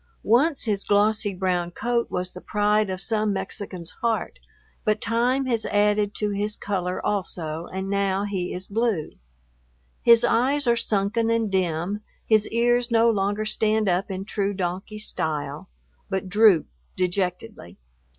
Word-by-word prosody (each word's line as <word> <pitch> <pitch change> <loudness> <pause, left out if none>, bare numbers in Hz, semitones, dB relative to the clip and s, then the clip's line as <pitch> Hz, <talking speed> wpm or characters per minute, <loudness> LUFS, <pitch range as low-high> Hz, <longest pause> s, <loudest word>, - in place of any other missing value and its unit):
Once 270 +7 +3
his 205 -4 -1
glossy 205 +1 +2
brown 180 -2 -1
coat 235 +6 -1
was 180 0 -3
the 180 - -9
pride 210 0 +1
of 185 -1 -3
some 215 +2 0
Mexican's 190 -3 -5
heart, 230 -2 -1 0.4
but 215 0 +1
time 245 +5 +1
has 235 -3 0
added 205 0 +2
to 210 -1 -1
his 205 +1 -2
color 185 -3 -2
also, 170 -5 -2
and 190 +1 -4
now 200 0 0
he 190 -3 -3
is 185 +1 -4
blue. 215 -7 -1 0.9
His 235 -1 +6
eyes 275 +4 +2
are 235 -1 +4
sunken 225 +1 0
and 230 -2 +1
dim, 185 +2 -1 0.2
his 215 -1 +3
ears 240 +1 +2
no 230 0 +4
longer 205 +1 0
stand 215 0 +1
up 180 +2 +1
in 190 0 -4
true 200 -1 -1
donkey 185 +3 -3
style, 160 - -3 0.4
but 190 -1 -2
droop 205 -4 +5 0.3
dejectedly. 180 - -3
205 Hz, 145 wpm, -24 LUFS, 185-225 Hz, 0.9 s, His